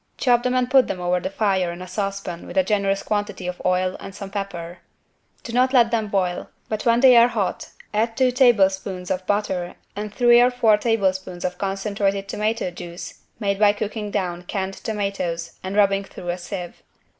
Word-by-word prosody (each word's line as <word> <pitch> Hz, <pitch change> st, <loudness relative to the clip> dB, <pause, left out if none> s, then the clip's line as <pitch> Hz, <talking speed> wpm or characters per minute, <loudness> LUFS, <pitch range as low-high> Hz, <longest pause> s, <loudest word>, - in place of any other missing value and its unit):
Chop 245 Hz, -2 st, +3 dB
them 250 Hz, +1 st, 0 dB
and 250 Hz, -1 st, +2 dB
put 265 Hz, -1 st, +5 dB
over 180 Hz, -1 st, 0 dB
the -, -, -3 dB
fire 195 Hz, -3 st, 0 dB
in 170 Hz, -, -8 dB
a 185 Hz, -, -8 dB
saucepan 195 Hz, -2 st, -4 dB
with -, -, -7 dB
a 285 Hz, -, +5 dB
generous 200 Hz, -4 st, 0 dB
quantity 205 Hz, -3 st, -2 dB
of 180 Hz, 0 st, -5 dB
oil 185 Hz, 0 st, +1 dB
and 195 Hz, -, -9 dB
some 195 Hz, -1 st, -8 dB
pepper. 180 Hz, -4 st, -5 dB, 0.6 s
Do 230 Hz, -, -7 dB
not 255 Hz, +2 st, +3 dB
let 235 Hz, -3 st, +5 dB
them 220 Hz, -2 st, 0 dB
boil, 185 Hz, -3 st, -1 dB, 0.2 s
but 215 Hz, +2 st, -2 dB
when 235 Hz, +1 st, +4 dB
they 260 Hz, -2 st, +8 dB
are 235 Hz, 0 st, +8 dB
hot -, -, -2 dB, 0.2 s
add 225 Hz, +2 st, 0 dB
two 260 Hz, -1 st, +3 dB
tablespoons 195 Hz, -7 st, +2 dB
of 185 Hz, 0 st, -2 dB
butter 190 Hz, -4 st, -1 dB, 0.2 s
and 210 Hz, +1 st, -5 dB
three 240 Hz, +2 st, +5 dB
or 245 Hz, -, +5 dB
four 240 Hz, -4 st, +4 dB
tablespoons 190 Hz, -5 st, -1 dB
of 180 Hz, 0 st, -3 dB
concentrated 195 Hz, 0 st, -1 dB
tomato 215 Hz, -2 st, -1 dB
juice 175 Hz, 0 st, -9 dB, 0.2 s
made 200 Hz, -2 st, -1 dB
by 205 Hz, -1 st, +5 dB
cooking 210 Hz, 0 st, -4 dB
down 180 Hz, -4 st, -2 dB
canned 190 Hz, 0 st, -3 dB
tomatoes 195 Hz, -6 st, -4 dB
and 190 Hz, +1 st, -4 dB
rubbing 200 Hz, -1 st, +3 dB
through 180 Hz, -2 st, -9 dB
a 175 Hz, -, -1 dB
sieve. 180 Hz, -1 st, -7 dB
200 Hz, 190 wpm, -22 LUFS, 185-225 Hz, 0.6 s, they